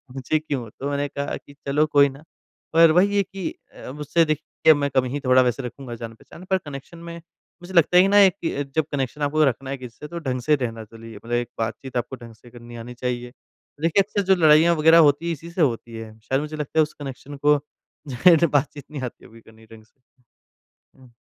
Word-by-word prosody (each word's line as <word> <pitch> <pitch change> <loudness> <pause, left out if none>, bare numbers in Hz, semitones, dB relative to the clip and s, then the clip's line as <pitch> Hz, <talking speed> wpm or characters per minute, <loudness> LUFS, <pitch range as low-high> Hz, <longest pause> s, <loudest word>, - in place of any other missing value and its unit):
मुझे 135 +4 0
क्यों? 140 -7 -4
तो 140 +2 -3
मैंने 145 0 -1
कहा 140 +1 -4
कि 145 - -17
चलो 150 +3 +2
कोई 145 -1 +4
ना, 140 +3 -13 0.5
पर 165 -1 +7
वही 200 +4 +3
है 200 - +3
कि 190 -1 -5 0.2
अ, - - -17
अब 140 +4 -9
उससे 165 +3 +2
देखिए 155 +1 +2
मैं 140 -1 -1
कम 130 -1 +3
ही 140 +3 -3
थोड़ा 130 0 +5
वैसे 125 +1 0
रखूँगा 125 0 -7
जान-पहचान 115 +9 -11
पर 190 - +3
कनेक्शन 145 0 -10
में, 170 0 -9 0.5
मुझे 185 +2 -10
लगता 175 +1 +4
है 185 +2 +7
ना 200 -1 +7
कि 165 -5 -4
जब 160 -2 +2
कनेक्शन 140 +1 -3
आपको 155 +2 +2
रखना 135 +1 -2
है 135 - -3
किसी 125 -2 -11
से 150 - -8
तो 170 +1 -6
ढंग 130 -5 -3
से 150 +4 +3
रहना 115 -4 -4
चलिए। 115 0 -12
मतलब 115 +3 -12
एक 120 0 0
बात-चीत 120 +3 -4
आपको 125 +2 -3
ढंग 115 -2 -12
से 120 +2 -18
करनी 120 0 -12
आनी 125 +1 -9
चाहिए, 125 0 -4
तो 145 +3 -23
देखिए 170 +4 +4
अक्सर 205 0 -2
जो - - +4
लड़ाइयाँ 160 0 +5
वगैरह 160 +2 +6
होती 145 +4 -2
है - - 0
इसी 165 +3 -9
से 175 - -2
होती 115 -4 0
है। 110 -1 -9
शायद 135 +5 -1
मुझे 150 +1 -6
लगता 150 +2 -2
है - - +7
उस 150 - -6
कनेक्शन 140 +1 -8
को 150 0 +6 0.5
जाहिर 160 +6 +5
है 170 - +5
बात-चीत 145 0 -4
नहीं 145 -3 -6
आती 115 -2 -9
करनी 110 0 -19
ढंग 110 -1 -13
से। 125 +4 -34 1.0
हुँ। 125 -2 -19
140 Hz, 230 wpm, -23 LUFS, 125-160 Hz, 1.0 s, पर